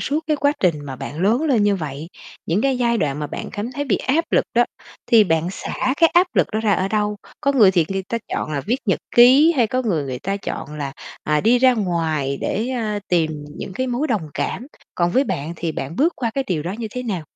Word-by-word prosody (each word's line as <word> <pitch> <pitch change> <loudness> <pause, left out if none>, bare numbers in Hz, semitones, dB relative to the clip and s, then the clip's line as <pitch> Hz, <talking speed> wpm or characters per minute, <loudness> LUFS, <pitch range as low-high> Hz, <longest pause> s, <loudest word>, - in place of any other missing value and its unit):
suốt 300 +3 -1
cái 305 - +1
quá 285 +1 +2
trình 180 -4 +3
mà 135 -2 -6
bạn 150 +6 -6
lớn 225 +9 +2
lên 260 -9 +2
như 205 -1 +3
vậy, 155 -1 -6 0.4
những 175 +6 +1
cái 270 -2 +1
giai 235 -2 +1
đoạn 145 -1 -1
mà 150 - -3
bạn - - -6
cảm 220 +4 -4
thấy 285 +3 -3
bị - - +1
áp 310 +6 -1
lực - - +4
đó 240 +1 +5 0.4
thì 225 -3 +6
bạn 165 0 0
xả 260 +6 -2
cái 330 -1 +5
áp 355 +2 +6
lực - - +4
đó 215 - 0
ra 215 -2 +2
ở 190 0 +1
đâu? 210 -1 0 0.2
Có 280 -1 +2
người 215 -8 +6
thì 175 -4 +2
người 195 0 -2
ta 230 - -1
chọn 155 - -2
là 140 - -1
viết 235 - -1
nhật 195 - +2 0.2
ký 265 +7 +7
hay 235 -3 +4
có 255 +3 -1
người, 170 -11 0
người 130 -2 -4
ta 195 +1 -2
chọn 150 -6 -6
là, 140 -2 -4 0.3
à, 150 -1 +2
đi 245 +3 +4
ra 255 0 +5
ngoài 160 - -1
để, 220 +6 -1
ơ, 220 -5 -2
tìm 155 -4 0
những - - -6
cái 255 +7 -2
mối 255 +5 -1
đồng 205 - -1
cảm. 250 - -3 0.3
Còn 175 0 +1
với 265 +8 +3
bạn 150 - -3
thì 165 -2 -3
bạn 145 +3 -5
bước 330 +5 +3
qua 235 -3 -1
cái 270 -1 -1
điều 160 -5 -1
đó 175 - -4
như 230 - -3
thế 250 +2 -5
nào? 195 -8 -3
210 Hz, 255 wpm, -21 LUFS, 165-255 Hz, 0.4 s, ký